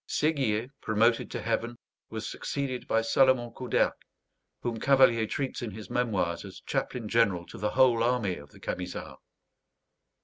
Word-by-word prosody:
Séguier, 130 -6 0
promoted 115 +2 +2
to - - -5
heaven, 120 +1 -1 0.3
was - - -5
succeeded 135 -3 -3
by 115 0 +2
Salomon 125 0 +3
Couderc, 125 -2 +1 0.7
whom 115 -2 -2
Cavalier 130 -4 +5
treats 135 +2 -3
in 120 - -3
his 105 +1 -9
memoirs 100 -9 0
as - - -10
chaplain 120 -4 -2
general 100 -6 +2
to - - -11
the 105 - 0
whole 125 -3 +5
army 115 -6 +1
of 75 0 -12
the - - -17
Camisards. 90 0 -5
115 Hz, 145 wpm, -29 LUFS, 105-125 Hz, 0.7 s, Cavalier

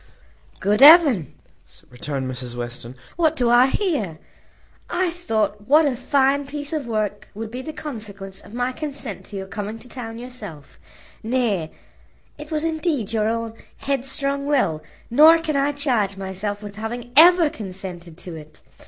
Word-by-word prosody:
"Good 210 +4 +1
heaven!" 285 - +7 0.6
returned 130 +1 -4
Mrs 125 -1 -6
Western, 120 0 -6 0.2
"what 320 -2 +2
do 245 -5 +2
I 245 +2 +6
hear? 270 - -1 0.7
I 360 0 0
thought 215 - -2
what 305 +3 +6
a 275 -3 +1
fine 275 +2 +1
piece 290 +1 -5
of 295 -5 -2
work 215 -3 -2
would 220 +1 -6
be 250 +2 -5
the 315 - -6
consequence 205 -10 -8
of 220 - -13
my 245 +1 0
consent 275 - -6
to 205 - -10
your 190 -1 -4
coming 205 +2 -5
to 235 - -12
town 230 -3 -7
yourself; 210 - -10 0.4
nay, 220 -9 0 0.7
it 300 0 -9
was 310 -1 -1
indeed 315 - -1
your 215 -1 +1
own 230 0 -3 0.2
headstrong 275 +1 -2
will, 195 - +1 0.3
nor 310 +6 +8
can 320 -2 -3
I 280 +1 +2
charge 245 -9 0
myself 195 +2 -4
with 205 0 -9
having 240 +2 -5
ever 335 0 +8
consented 185 - -8
to 180 -1 -8
it. 155 -1 -13
230 Hz, 155 wpm, -22 LUFS, 195-285 Hz, 0.7 s, nor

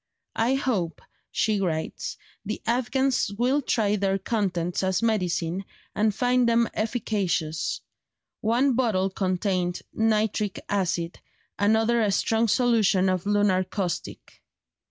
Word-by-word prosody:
"I 240 +4 +3
hope," 200 - -1 0.3
she 215 -3 0
writes, 160 -4 -3 0.3
"the 215 +1 -4
Afghans 255 +1 +1
will 255 +5 +2
try 215 -5 +1
their 195 -1 +1
contents 185 -4 -1
as 190 +3 0
medicine, 185 -4 0 0.3
and 215 +1 +2
find 250 -1 +2
them 235 0 +3
efficacious: 200 -8 -1 0.6
one 245 +5 +2
bottle 215 -6 +1
contained 185 -1 -1
nitric 215 -2 0
acid, 175 -4 -1 0.4
another 220 +3 +3
a 210 -2 +2
strong 225 +3 +2
solution 215 -5 +3
of 185 +1 -1
lunar 205 -2 +3
caustic." 185 -2 -5
205 Hz, 115 wpm, -26 LUFS, 185-230 Hz, 0.6 s, I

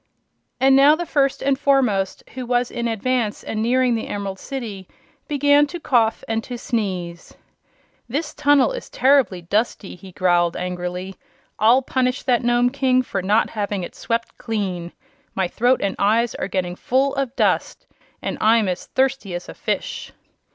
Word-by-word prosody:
And 265 +1 +5
now 280 +3 +7
the 345 +2 -4
First 275 -3 0
and 275 -1 +1
Foremost, 250 -10 +1
who 255 - -5
was 245 0 +1
in 235 -1 -2
advance 230 0 -1
and 215 - -3
nearing 250 +2 +2
the 225 - -2
Emerald 200 -2 -4
City, 215 -9 -6 0.4
began 290 0 +4
to 345 +4 -7
cough 235 -8 +1
and 225 0 -1
to 245 - -6
sneeze. 185 -8 -4 0.7
"This 295 +4 -3
tunnel 290 - +3
is - - -7
terribly 260 -9 +2
dusty," 205 +2 -1
he 185 +1 -12
growled, 175 -2 +1
angrily. 180 +1 -4 0.4
"I'll 235 +5 +5
punish 255 0 -1
that 245 -3 +2
Nome 240 +1 +2
King 255 -2 +2
for 195 -5 -3
not 205 +4 +2
having 205 -3 -3
it - - -7
swept 230 0 -3
clean. 185 -6 -3 0.4
My 190 -2 +1
throat 245 +7 +1
and 200 - -1
eyes 220 +2 +2
are - - -4
getting 180 -2 -2
full 265 +7 +1
of 270 -2 -2
dust - - 0 0.4
and - - -3
I'm 220 -1 +4
as 180 -1 -3
thirsty 265 -8 0
as 175 - -6
a - - -8
fish!" - - -4
230 Hz, 165 wpm, -21 LUFS, 195-265 Hz, 0.7 s, now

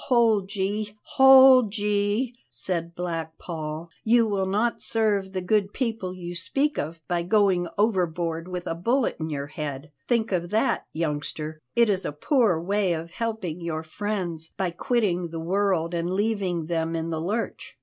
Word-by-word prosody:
"Hold 220 -5 +3
ye, 205 +2 -2
hold 260 -4 +7
ye!" 205 +4 0 0.2
said 170 -2 -3
Black 165 -2 -4
Paul, 160 0 -6
"you 230 +1 +4
will 195 -2 0
not 215 +5 0
serve 205 -4 +1
the 190 -1 -3
good 205 +1 +1
people 225 -7 -2
you 175 -1 -6
speak 275 - -1
of 165 +3 -4
by 175 -1 0
going 185 -1 +2
overboard 175 -5 0
with 180 -1 -5
a - - -1
bullet 235 +10 0
in 160 0 -3
your 140 -2 -3
head; 145 0 -6 0.2
think 230 -2 +1
of 175 -2 -1
that, 220 +3 +1
youngster. 155 0 -3
It 235 -1 +5
is 195 -2 +1
a - - -2
poor 200 - +2
way 195 +1 +1
of 165 +1 -5
helping 210 -6 -3
your 160 -2 -3
friends 175 -2 -3
by 185 -2 0
quitting 180 -3 0
the 165 0 -6
world 180 -1 0
and 170 0 -1
leaving 190 -4 0
them 165 0 -1
in 165 0 -2
the 160 -1 -2
lurch." 210 +7 -3
185 Hz, 165 wpm, -25 LUFS, 165-215 Hz, 0.2 s, hold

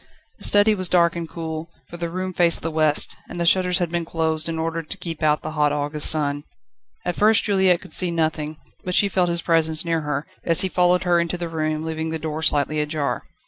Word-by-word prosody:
The - - +1
study 205 +1 +4
was 185 -4 -1
dark 170 -2 +3
and 170 -1 -5
cool; 160 -1 -6 0.2
for - - -10
the 170 -1 -3
room 185 +2 -4
faced 170 -1 +2
the 165 - -2
west, 155 -1 +2
and 175 - -7
the 170 - 0
shutters 180 0 +3
had 175 -3 -1
been 170 -1 -1
closed, 160 -1 -2
in 165 - -3
order 165 +1 -2
to 160 +5 -9
keep 165 -4 -6
out 150 -1 +2
the 155 - -4
hot 150 -1 +1
August 145 +1 -1
sun. 145 -2 -1 0.6
At 175 - -1
first 215 +1 +4
Juliette 190 -4 +2
could - - -12
see 180 - +3
nothing, 155 -2 -2 0.3
but 180 0 -1
she 205 - +4
felt 180 -2 +1
his 170 -1 +1
presence 160 -1 +2
near 165 -1 0
her, 150 0 -3 0.2
as 165 -1 +5
he 190 - -1
followed 180 0 +2
her 175 -1 +3
into 170 +1 -1
the 170 -1 -4
room, 155 -1 -2
leaving 160 0 -3
the 160 - -2
door 155 0 -4
slightly 150 0 +1
ajar. 150 -1 -2
165 Hz, 230 wpm, -22 LUFS, 155-175 Hz, 0.6 s, as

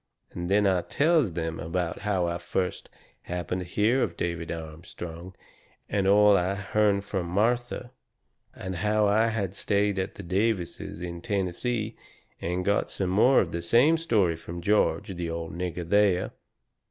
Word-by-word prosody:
Then 95 +4 +1
I 95 -2 +3
tells 150 - +2
them 80 0 -3
about 85 +1 -2
how 95 -3 0
I 85 0 -2
first 90 +1 -3 0.3
happened 90 +1 -3
to 90 - -7
hear 110 +8 +2
of 85 -7 -1
David 85 -1 -3
Armstrong, 85 +2 -8 0.5
and 100 -2 0
all 105 +1 +6
I 95 +1 +1
had 100 0 -7
hearn 105 -2 +3
from 95 -3 -3
Martha. 120 +6 0 0.6
And 95 -1 -5
how 105 +3 +2
I 110 +3 +3
had 105 -5 -2
stayed 100 -1 +1
at 95 - -3
the 100 - -8
Davises 95 -2 -1
in 85 -1 -5
Tennessee 105 +3 -2 0.5
and 90 +2 -2
got 100 0 +1
some 95 -2 -2
more 120 +7 +5
of 85 - -3
the 85 - -3
same 120 - +4
story 110 - +2
from 85 +1 -8
George, 100 0 +1
the 85 -1 -3
old 80 -1 -5
nigger 90 -1 -4
there. 100 -1 +3
95 Hz, 160 wpm, -27 LUFS, 85-105 Hz, 0.6 s, all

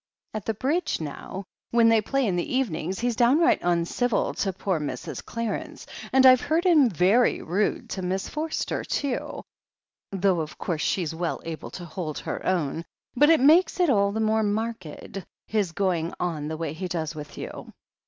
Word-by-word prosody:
At 215 -3 -5
the 225 - -1
Bridge 300 - 0
now, 160 +5 -6 0.3
when 235 -1 +4
they 225 -1 +4
play 275 +5 0
in 190 -5 0
the 175 +8 -2
evenings, 190 -7 -1
he's 240 -1 0
downright 305 +9 +4
imcivil 175 +7 0
to 195 - 0
poor 185 -2 -1
Mrs. 140 -4 -5
Clarence, 230 -2 -4 0.3
and 265 0 +5
I've 255 -1 +8
heard 325 +4 0
him 305 -8 +6
very 200 +7 +3
rude 195 +6 -1
to 190 - -3
Miss 185 +1 -2
Forster 310 +1 -3
too, 280 -4 -3 0.7
though 190 -2 +2
of 155 -1 -5
course 165 -3 -2
she's 170 -3 0
well 170 +1 -2
able 165 -1 -6
to 175 - -8
hold 160 -3 -5
her - - -5
own. 165 -3 0 0.3
But 295 +4 +5
it 325 -5 +5
makes 325 +7 +5
it 350 -5 +4
all 200 -3 +3
the 220 - -3
more 220 0 +2
marked, 205 -4 -3 0.2
his 205 -5 0
going 175 -2 -1
on 160 -4 -2
the 160 0 -4
way 160 -2 -3
he 185 +3 -4
does 165 -2 -3
with 150 -1 -9
you." - - -7
195 Hz, 180 wpm, -26 LUFS, 170-245 Hz, 0.7 s, I've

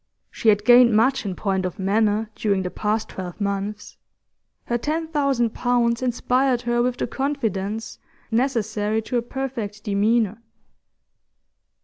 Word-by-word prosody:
She 225 - +1
had 205 0 +3
gained 240 -1 +7
much 235 +1 +2
in 190 - -3
point 190 -1 -1
of 185 -2 -4
manner 210 +2 +1
during 200 -4 0
the 180 - -4
past 215 +1 -1
twelve 180 0 -7
months; 200 +1 -3 0.7
her 240 0 -1
ten 320 +5 -2
thousand 275 -7 +1
pounds 240 -1 +1
inspired 250 0 +1
her 240 0 +1
with 245 0 0
the - - -1
confidence 225 -7 -3 0.3
necessary 220 -3 0
to 245 - -2
a - - +1
perfect 235 -5 -5
demeanour. 215 +1 +1
225 Hz, 135 wpm, -23 LUFS, 205-245 Hz, 0.7 s, gained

